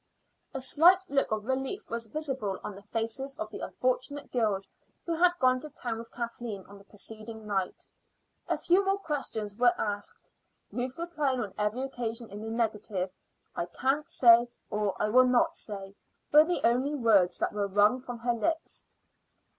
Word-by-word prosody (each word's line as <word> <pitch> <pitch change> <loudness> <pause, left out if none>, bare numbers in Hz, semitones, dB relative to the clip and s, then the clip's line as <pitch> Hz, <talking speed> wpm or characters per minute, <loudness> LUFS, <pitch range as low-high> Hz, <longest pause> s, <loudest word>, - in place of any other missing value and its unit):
A 270 - -4
slight 340 +8 +5
look 275 -4 +2
of 215 -1 -1
relief 265 - -2
was 230 0 -4
visible 265 -7 -3
on 210 - -5
the 195 - -11
faces 230 +6 -3
of 325 - -5
the - - -6
unfortunate - - -2
girls 210 -5 0 0.3
who 335 - -1
had 350 +2 +4
gone 255 -3 +3
to 305 - -7
town 235 -5 -4
with 230 0 -10
Kathleen 235 -4 -5
on 200 0 -13
the - - -16
preceding 220 +2 -7
night. 195 -3 -2 0.6
A - - +1
few 365 +3 +3
more 390 0 +2
questions 270 - -2
were 240 +1 +4
asked, 205 -1 -4 0.4
Ruth 250 +1 -3
replying 305 -6 -1
on 205 -5 -3
every 210 +5 -1
occasion 235 -4 -4
in 205 +1 -7
the 220 - -5
negative. 210 -5 -1 0.4
"I 170 - -2
can't 270 - 0
say," 235 -1 +6 0.2
or 210 -2 -1
"I 210 - +2
will 255 +3 +6
not 250 -1 +3
say," 195 -2 -6 0.4
were 300 +1 +8
the 350 +1 0
only 255 +5 +2
words 215 -9 +4
that - - -1
were 205 -1 0
wrung 205 +5 +4
from 245 -2 -6
her 240 +1 0
lips. 320 +8 -2
235 Hz, 175 wpm, -29 LUFS, 210-275 Hz, 0.6 s, were